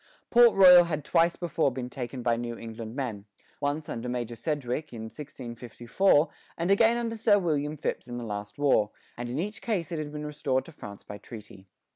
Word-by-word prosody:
Port 240 -1 +7
Royal 180 -2 +9
had 155 -4 -3
twice 170 +1 +3
before 165 -4 0
been 125 0 -5
taken 125 0 -6
by 120 -1 +2
New 120 0 -4
England 115 0 -8
men, 115 -8 -4 0.3
once 145 +2 -2
under 120 +1 -4
Major 120 -1 -3
Sedgwick 145 +1 -3
in 115 -2 -7
1654, 125 - 0 0.3
and 170 +3 0
again 225 +4 +4
under 230 -1 -2
Sir 215 -2 +4
William 155 -5 -1
Phips 135 - -3
in 120 0 -6
the 120 - -5
last 105 -1 -6
war; 135 -7 +3 0.3
and 120 0 -5
in 125 - -3
each 210 +6 -3
case 185 -9 -2
it 165 - -2
had 150 -1 -5
been 150 0 -6
restored 145 -3 -1
to 165 - -12
France 105 -9 -10
by 105 0 -9
treaty. 105 -3 -12
140 Hz, 195 wpm, -28 LUFS, 120-165 Hz, 0.3 s, Royal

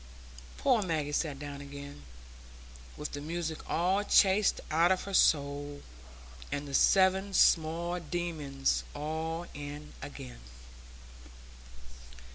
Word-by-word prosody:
Poor 250 -5 +3
Maggie 160 -6 -1
sat 145 -1 -1
down 145 0 -7
again, 140 - -9 1.0
with 150 - -5
the 145 - -5
music 160 +1 -3
all 185 +4 +1
chased 200 0 +4
out 165 +3 +4
of 185 - +1
her 200 - -7
soul, 145 -3 +2 0.7
and 145 0 -3
the 140 - -8
seven 190 +4 +4
small 170 +2 +3
demons 155 -5 -2
all 160 +3 -3
in 145 +1 -8
again. - - -9
155 Hz, 105 wpm, -31 LUFS, 145-175 Hz, 1.0 s, chased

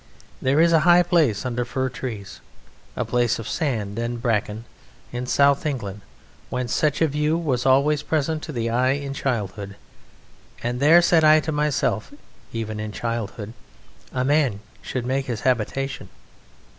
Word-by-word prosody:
There 135 +3 +2
is 170 +1 +5
a 165 - +6
high 175 +3 +6
place 155 - +2
under 125 -1 -1
fir 130 +2 -2
trees, 115 -6 -7 0.5
a - - -2
place 120 -1 +1
of 115 - -7
sand 115 - -2
and 120 0 -3
bracken, 115 -2 -1 0.5
in 125 +1 -4
South 140 +1 +3
England 105 -10 -4 0.5
whence 125 -2 -2
such 150 +1 +1
a - - +4
view 150 +2 0
was 135 -7 -1
always 140 +3 +3
present 155 +1 -1
to 120 -8 -3
eye 125 +3 +2
in 140 -1 -4
childhood 105 -7 -3 0.9
and 120 +1 -2
"There," 165 +5 +6
said 165 -2 +4
I 155 0 +7
to 160 - -3
myself 150 - 0 0.4
(even 110 -2 -4
in 110 0 -4
childhood) 115 -1 -4 0.6
"a 125 0 -1
man 140 -8 +2 0.2
should 125 +2 -4
make 135 +2 -1
his 120 -4 -3
habitation." 130 +2 -1
130 Hz, 155 wpm, -23 LUFS, 115-150 Hz, 0.9 s, I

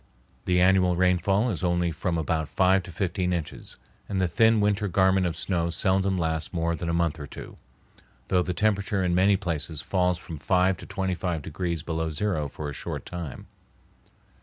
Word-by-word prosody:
The 90 -1 +2
annual 90 -1 +4
rainfall 95 +5 +2
is 95 -1 -4
only 85 -1 +1
from 85 +2 -2
about 80 -1 -1
five 95 +1 +3
to 90 - -10
fifteen 90 0 -1
inches, 85 -4 -4 0.3
and 95 - -1
the 95 - +2
thin 110 +6 +4
winter 105 0 +1
garment 95 0 +3
of 85 -2 -4
snow 85 -2 0
seldom 95 +2 +1
lasts 80 -1 -1
more 85 0 0
than 85 +1 -4
a - - +1
month 85 -1 0
or 70 - -6
two, - - -10 0.7
though 90 -1 +3
the 90 - -2
temperature 100 0 +1
in 90 -1 +1
many 95 +2 +4
places 80 -5 -3
falls 90 +2 +1
from 85 -4 -9
five 95 +3 +2
to - - -11
twenty 95 -1 -2
five 85 -4 -3
degrees 85 0 -3
below 80 -1 -2
zero 80 -1 -1
for 75 +2 -6
a 75 - -5
short - - -5
time. 85 -6 -7
90 Hz, 185 wpm, -26 LUFS, 85-95 Hz, 0.7 s, annual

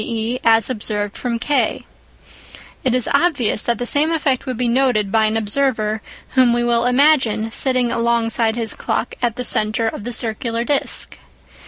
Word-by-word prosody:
e. 230 +1 -3
as 225 0 +4
observed 210 -4 -3
from 240 -2 -3
K. 285 +5 0 1.0
It 255 -1 +1
is 250 - +1
obvious 280 -8 +1
that 235 -2 -1
the 245 - -4
same 295 +6 +2
effect 280 -5 0
would 255 -3 -3
be 250 0 0
noted 235 -5 +1
by 220 0 +3
an 215 +1 0
observer 220 -1 0 0.3
whom 255 -2 +3
we 240 0 0
will 235 0 +1
imagine 250 -5 +2
sitting 255 -1 +1
alongside 230 -1 +1
his 225 -3 -2
clock - - -3
at 235 -2 0
the 250 - -4
centre 215 +1 0
of 210 - -5
the 245 - -4
circular 230 0 -2
disc. 280 +3 0
235 Hz, 170 wpm, -19 LUFS, 220-255 Hz, 1.0 s, as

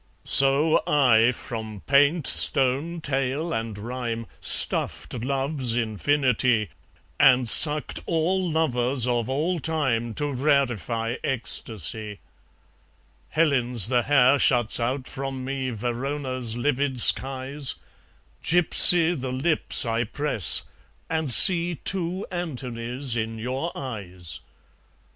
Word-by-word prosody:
So 140 +4 +2
I, 125 -5 +3
from 110 -4 -9
paint, 145 - +2
stone, 140 +6 +1
tale, 140 +4 -3
and 115 -2 -5
rhyme, 115 +1 -6
Stuffed - - 0
love's 135 0 -2
infinity, 120 - -1 0.5
And 130 -4 +3
sucked 150 +5 +4
all 175 +3 -1
lovers 130 -5 -1
of 120 -1 -2
all 160 +6 -2
time 130 -8 -3
To 145 -1 -4
rarify 125 -4 -2
ecstasy. 110 - -4 1.1
Helen's 125 - +1
the 125 -2 +1
hair 135 +1 +2
shuts 120 -6 +2
out 125 +3 -3
from 135 -1 -7
me 135 -1 -4
Verona's 125 +1 -4
livid 135 0 -1
skies; 135 +3 +4 0.7
Gypsy 175 0 +7
the 130 -5 -6
lips 140 +3 0
I 115 0 -2
press; 115 - 0 0.5
and 160 -3 -3
see 175 - +6
Two 185 +2 -4
Antonys 125 -6 -4
in 115 0 -4
your 130 +8 -5
eyes. 95 - -8
130 Hz, 105 wpm, -23 LUFS, 120-145 Hz, 1.1 s, Gypsy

